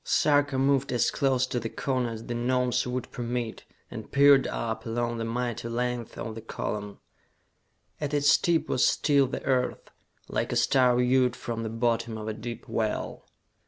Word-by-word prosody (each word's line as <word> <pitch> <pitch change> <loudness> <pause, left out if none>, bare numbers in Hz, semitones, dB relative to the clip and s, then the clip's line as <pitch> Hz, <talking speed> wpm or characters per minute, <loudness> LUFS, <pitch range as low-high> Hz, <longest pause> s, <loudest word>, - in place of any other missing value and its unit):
Sarka 145 -2 +2
moved 135 0 +2
as 120 - +2
close 135 -3 +1
to 125 -1 -2
the 115 -1 -4
cone 130 -1 -1
as 115 -1 -6
the 120 - -4
Gnomes 125 +1 0
would 125 0 -4
permit, 120 -2 -4 0.3
and - - -8
peered 140 -1 +6
up 110 -1 -3
along 120 0 -2
the 115 - -2
mighty 120 0 -3
length 120 0 -3
of 115 - -5
the 115 - -8
column. 105 -2 -5 1.0
At 150 -1 -3
its 145 0 +4
tip 170 -2 +1
was 125 - +1
still 140 -2 +3
the - - -5
Earth, 130 -2 -1 0.4
like - - -2
a - - -1
star 130 -3 +4
viewed 125 0 +3
from 115 -1 -5
the 110 - -3
bottom 115 0 -1
of 110 0 -6
a 110 - -2
deep 115 +2 -7
well. 110 -2 -3
125 Hz, 175 wpm, -27 LUFS, 115-130 Hz, 1.0 s, peered